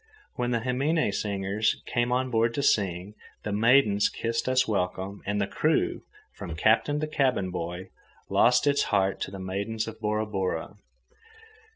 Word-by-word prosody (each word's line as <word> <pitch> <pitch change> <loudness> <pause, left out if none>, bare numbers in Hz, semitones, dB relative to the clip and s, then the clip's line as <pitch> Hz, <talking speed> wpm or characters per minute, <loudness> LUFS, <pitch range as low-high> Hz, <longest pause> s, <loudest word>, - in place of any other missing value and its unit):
When 120 -1 -2
the 120 -2 0
himine 135 +2 +1
singers 100 +1 -1
came 120 0 0
on 130 +1 0
board 115 0 +1
to 140 - -1
sing, 95 -5 +1 0.3
the 105 - -3
maidens 105 -1 +4
kissed 115 +2 -2
us 130 0 +3
welcome, 95 -1 -2
and 105 0 0
the 100 - +1
crew, - - 0 0.3
from 80 - -7
captain 115 - +2
to 155 - -1
cabin 130 -11 0
boy, 90 +2 -5 0.4
lost 125 +3 +4
its 145 0 +2
heart 95 -2 +1
to - - -2
the 95 - -8
maidens 100 +4 -3
of 110 0 -8
Bora 105 0 -1
Bora. 95 -6 -3
110 Hz, 160 wpm, -27 LUFS, 95-125 Hz, 0.4 s, maidens